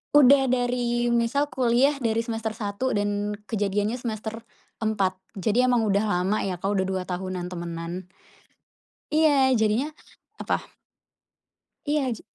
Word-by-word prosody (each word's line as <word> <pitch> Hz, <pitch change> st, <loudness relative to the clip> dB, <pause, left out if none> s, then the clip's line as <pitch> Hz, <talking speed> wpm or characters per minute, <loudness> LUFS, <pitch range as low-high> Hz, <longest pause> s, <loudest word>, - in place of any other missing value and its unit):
Udah 280 Hz, -1 st, +7 dB
dari 245 Hz, -1 st, 0 dB
misal 235 Hz, +5 st, +1 dB
kuliah 260 Hz, +2 st, +2 dB
dari 225 Hz, -1 st, +1 dB
semester 225 Hz, -1 st, -2 dB
1 215 Hz, +4 st, -3 dB
dan 205 Hz, -1 st, -1 dB, 0.2 s
kejadiannya 205 Hz, +1 st, 0 dB
semester 225 Hz, -2 st, -5 dB, 0.4 s
4. 200 Hz, -4 st, +1 dB, 0.2 s
Jadi 225 Hz, +5 st, +2 dB
emang 245 Hz, -3 st, +3 dB
udah 200 Hz, +1 st, +2 dB
lama 195 Hz, 0 st, 0 dB
ya 185 Hz, -3 st, -3 dB
Kak, 195 Hz, -, -2 dB
udah 200 Hz, -1 st, +1 dB
2 190 Hz, -1 st, -2 dB
tahunan 180 Hz, -1 st, -4 dB
temenan. 170 Hz, +1 st, -6 dB, 1.0 s
Iya, 310 Hz, +1 st, +4 dB, 0.3 s
jadinya 220 Hz, +6 st, +2 dB, 0.5 s
apa? -, -, 0 dB, 1.3 s
Iya, 300 Hz, 0 st, +2 dB
ja 225 Hz, -, -11 dB
220 Hz, 125 wpm, -25 LUFS, 195-245 Hz, 1.3 s, Udah